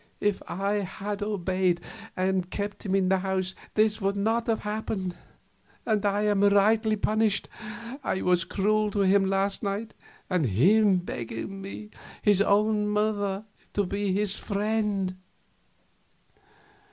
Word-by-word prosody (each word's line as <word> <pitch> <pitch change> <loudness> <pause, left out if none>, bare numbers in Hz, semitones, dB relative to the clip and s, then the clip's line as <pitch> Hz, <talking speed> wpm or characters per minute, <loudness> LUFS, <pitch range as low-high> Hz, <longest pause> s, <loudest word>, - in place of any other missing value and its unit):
If 205 -1 0
I 200 +3 -1
had 200 +1 -4
obeyed, 185 -3 0 0.4
and 185 -1 0
kept 205 +1 -4
him 190 - +1
in 190 -1 +2
the 190 0 +3
house, 190 -1 -1 0.2
this 215 0 +2
would 195 +1 0
not 225 +3 +1
have 225 -1 +1
happened. 210 -3 -3 0.7
And 215 -3 +1
I 205 0 +1
am 205 -1 +2
rightly 215 +2 +4
punished; 215 0 +1 0.6
I 190 - -1
was 180 -1 +3
cruel 215 +3 +1
to 205 0 -1
him 195 0 +4
last 195 +1 0
night, 210 +2 -3 0.3
and 180 -7 +1
him 190 - +4
begging 175 - -5
me, 210 +2 -8 0.3
his 205 -2 +4
own 210 +1 +3
mother, 210 -1 0 0.3
to 205 - +1
be 200 +1 -1
his 200 +1 0
friend." 205 -2 -1
200 Hz, 135 wpm, -27 LUFS, 190-210 Hz, 0.7 s, rightly